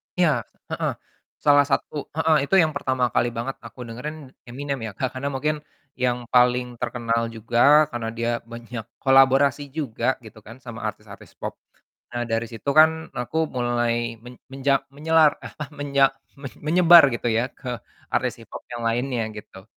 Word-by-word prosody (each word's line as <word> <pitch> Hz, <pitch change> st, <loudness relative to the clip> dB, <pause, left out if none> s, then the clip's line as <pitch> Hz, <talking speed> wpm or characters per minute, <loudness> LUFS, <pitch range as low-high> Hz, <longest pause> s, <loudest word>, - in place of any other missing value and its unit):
Iya. 175 Hz, -3 st, +4 dB, 0.4 s
Heeh. -, -, -1 dB, 0.5 s
Salah 145 Hz, -1 st, +6 dB
satu 145 Hz, +1 st, -2 dB
heeh, 160 Hz, 0 st, +3 dB
itu 195 Hz, -, +2 dB
yang 155 Hz, -, 0 dB
pertama 130 Hz, -3 st, 0 dB
kali 120 Hz, -, +2 dB
banget 130 Hz, +3 st, -3 dB
aku 115 Hz, +2 st, -12 dB
dengerin 140 Hz, +4 st, -7 dB, 0.2 s
Eminem 140 Hz, +2 st, -4 dB
ya -, -, -6 dB
Kak, 130 Hz, -, -1 dB
karena 140 Hz, +2 st, -2 dB
mungkin 150 Hz, +3 st, 0 dB, 0.4 s
yang 125 Hz, -1 st, +1 dB, 0.2 s
paling 125 Hz, 0 st, +3 dB
terkenal 115 Hz, -1 st, -1 dB
juga 120 Hz, +7 st, +4 dB
karena 115 Hz, -2 st, -3 dB
dia 115 Hz, +1 st, -1 dB
banyak 115 Hz, -1 st, -8 dB, 0.2 s
kolaborasi 135 Hz, +2 st, +4 dB
juga 135 Hz, -8 st, -3 dB, 0.2 s
gitu 110 Hz, 0 st, -12 dB
kan 115 Hz, -, -10 dB
sama 115 Hz, -2 st, -7 dB
artis-artis 105 Hz, -1 st, -10 dB
pop. -, -, -5 dB, 0.6 s
Nah 120 Hz, 0 st, -2 dB
dari 115 Hz, 0 st, -1 dB
situ 115 Hz, +4 st, -11 dB
kan 160 Hz, +1 st, +4 dB
aku 125 Hz, +6 st, -3 dB, 0.2 s
mulai 120 Hz, -1 st, -1 dB
men 125 Hz, 0 st, -11 dB, 0.2 s
menja 135 Hz, 0 st, +1 dB
menyelar 155 Hz, 0 st, +4 dB
apa 150 Hz, -, -7 dB, 0.2 s
menya 140 Hz, -1 st, +2 dB, 0.4 s
men 140 Hz, -3 st, -7 dB
menyebar 170 Hz, +2 st, +7 dB
gitu 120 Hz, -, -3 dB
ya 115 Hz, +3 st, +1 dB
ke -, -, -9 dB, 0.4 s
artis -, -, 0 dB
hip-hop -, -, -9 dB
yang 120 Hz, -1 st, -5 dB
lainnya 120 Hz, +1 st, -1 dB
gitu. 95 Hz, -2 st, -11 dB
125 Hz, 160 wpm, -23 LUFS, 120-145 Hz, 0.6 s, menyebar